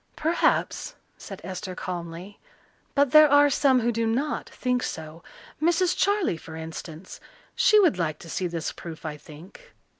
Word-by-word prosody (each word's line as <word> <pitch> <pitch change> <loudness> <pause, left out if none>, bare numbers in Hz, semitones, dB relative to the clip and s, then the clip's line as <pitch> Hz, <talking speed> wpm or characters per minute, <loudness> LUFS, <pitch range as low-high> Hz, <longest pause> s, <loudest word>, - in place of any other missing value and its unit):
"Perhaps," 340 +9 0 0.2
said - - -10
Esther 185 0 -6
calmly, 175 +2 -7 0.6
"but 280 -2 +3
there 305 -1 +8
are 290 0 +5
some 260 -1 +3
who 240 +1 +1
do 230 0 -1
not 265 +7 -1
think 250 -1 -1
so. 160 -3 -6 0.4
Mrs. 345 +2 +2
Charley, 400 - +1
for 160 0 -11
instance 160 +2 -8 0.3
she 425 - +5
would 345 - +3
like 155 -3 -1
to 170 - -13
see 185 -1 -1
this 165 -2 -4
proof, 165 -1 -10
I 155 -1 -4
think." 170 - -15
200 Hz, 155 wpm, -25 LUFS, -, 0.6 s, there